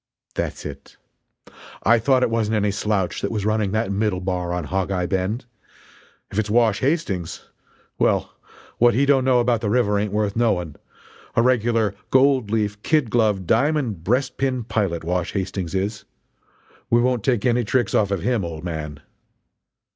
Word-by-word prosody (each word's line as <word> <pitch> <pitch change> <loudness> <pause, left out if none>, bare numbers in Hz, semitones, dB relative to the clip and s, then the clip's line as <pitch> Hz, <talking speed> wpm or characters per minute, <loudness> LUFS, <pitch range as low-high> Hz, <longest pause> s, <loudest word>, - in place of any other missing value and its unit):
"That's - - -4
it! 70 -2 -9 0.9
I 115 +2 +5
thought 130 +2 +3
it 115 - +1
wasn't 110 -1 0
any 105 -1 +1
slouch 105 -3 -1
that 100 - -1
was 105 -3 -3
running 110 -2 +1
that 110 -3 0
middle 100 -2 0
bar 90 -1 -2
in 90 - -3
Hog 95 +5 -2
eye 90 -2 -1
Bend. 95 +6 -2 0.9
If 105 - -1
it's 105 -1 -1
Wash 110 -2 +3
Hastings 125 - -2 0.5
well, - - +1 0.5
what 120 0 +5
he 140 +3 +3
don't 140 -2 +3
know 130 -1 +3
about 120 -2 +1
the 105 - -1
river 105 -3 +2
ain't 105 -1 -2
worth 105 -1 -1
knowing 95 -9 0 0.6
a 115 - +4
regular 115 -4 +2 0.2
gold 130 -4 +3
leaf, 105 -1 -1
kid 150 -6 +1
glove, 105 -5 +2
diamond 120 - +1
breastpin 130 +2 -1
pilot 95 -8 -1
Wash 90 0 -2
Hastings 95 -2 -3
is. 100 +2 -2 0.9
We 120 - +4
won't 125 -2 +1
take 120 -4 +1
any 120 -1 +2
tricks 120 0 0
off 100 -2 +2
of 100 -4 -2
him, 120 -5 +1
old 80 -2 -6
man!" 75 -4 -5
105 Hz, 165 wpm, -22 LUFS, 95-120 Hz, 0.9 s, I